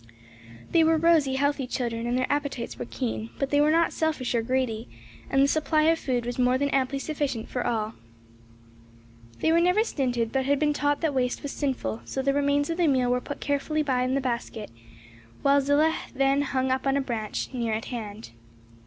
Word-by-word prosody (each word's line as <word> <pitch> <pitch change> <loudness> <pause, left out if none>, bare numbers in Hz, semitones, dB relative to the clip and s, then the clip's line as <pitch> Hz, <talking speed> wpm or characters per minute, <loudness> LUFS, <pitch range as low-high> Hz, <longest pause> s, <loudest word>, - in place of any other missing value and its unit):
They 330 - +5
were 320 0 +4
rosy, 315 -5 +3
healthy 285 -1 0
children 235 -2 -2
and 245 +1 0
their 255 - +1
appetites 285 - -3
were 125 - -4
keen; 110 -1 -3
but 275 - -2
they 290 0 +4
were 300 - +4
not 330 +1 +3
selfish 310 -6 -1
or 235 - +2
greedy, 240 -2 -1 0.4
and 270 0 +3
the - - +4
supply 310 +1 +2
of 325 +1 +3
food 245 -3 -1
was 245 +1 -4
more 250 +1 +3
than 280 +1 0
amply 270 0 +1
sufficient 275 -5 -3
for 250 - -3
all. 220 -1 -1 1.5
They 320 - +3
were 335 +1 +4
never 360 +5 +3
stinted 245 - -1
but 265 -1 0
had 285 +1 +2
been 295 +1 +2
taught 290 0 0
that 320 -3 0
waste 250 -1 -1
was 285 - -4
sinful; 185 - -2
so 265 - -3
the 275 +1 +2
remains 285 +2 +1
of 330 - -3
the 345 -2 +3
meal 255 -3 +2
were 250 0 +1
put 285 - -7
carefully 290 +2 0
by 260 -3 0
in 255 +1 0
the 275 - +1
basket, 235 - -4 0.7
which 280 0 +4
Zillah 300 +3 +3 0.2
then 275 +1 +3
hung 265 -2 0
up 260 +1 0
on 270 0 +2
a - - +2
branch 225 -5 -3
near 235 -3 -1
at 220 - -4
hand. 215 - -7
270 Hz, 205 wpm, -26 LUFS, 245-290 Hz, 1.5 s, They